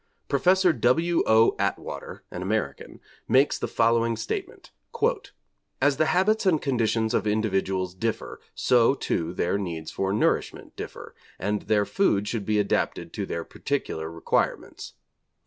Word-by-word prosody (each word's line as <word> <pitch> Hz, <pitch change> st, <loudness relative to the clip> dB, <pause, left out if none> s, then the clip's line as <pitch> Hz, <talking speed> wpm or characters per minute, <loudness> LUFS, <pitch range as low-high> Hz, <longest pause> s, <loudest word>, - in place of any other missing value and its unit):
Professor 185 Hz, -1 st, +3 dB
W. 160 Hz, +8 st, +2 dB
O. 110 Hz, +1 st, +5 dB
Atwater, -, -, -4 dB
an 90 Hz, -, -6 dB
American, 105 Hz, +3 st, -3 dB, 0.3 s
makes 135 Hz, +3 st, +3 dB
the -, -, -2 dB
following 115 Hz, 0 st, +2 dB
statement: 115 Hz, +1 st, -5 dB, 1.1 s
'As 140 Hz, 0 st, +2 dB
the 155 Hz, -, +2 dB
habits 195 Hz, +4 st, +2 dB
and 165 Hz, -5 st, +4 dB
conditions 115 Hz, -4 st, 0 dB
of 110 Hz, -, +1 dB
individuals 95 Hz, -4 st, 0 dB
differ, 110 Hz, +4 st, -4 dB
so, 125 Hz, +1 st, +4 dB
too, 85 Hz, -10 st, -2 dB
their 90 Hz, +2 st, -1 dB
needs 80 Hz, -5 st, -5 dB
for 95 Hz, 0 st, -1 dB
nourishment 105 Hz, -, -1 dB
differ, -, -, -8 dB, 0.2 s
and 105 Hz, 0 st, -1 dB
their 105 Hz, -1 st, +1 dB
food 105 Hz, -, +1 dB
should 105 Hz, -3 st, -3 dB
be 105 Hz, -1 st, +2 dB
adapted 105 Hz, -1 st, -1 dB
to -, -, -4 dB
their 85 Hz, -, -3 dB
particular 80 Hz, -, -3 dB
requirements. 85 Hz, 0 st, -2 dB
110 Hz, 135 wpm, -26 LUFS, 100-135 Hz, 1.1 s, O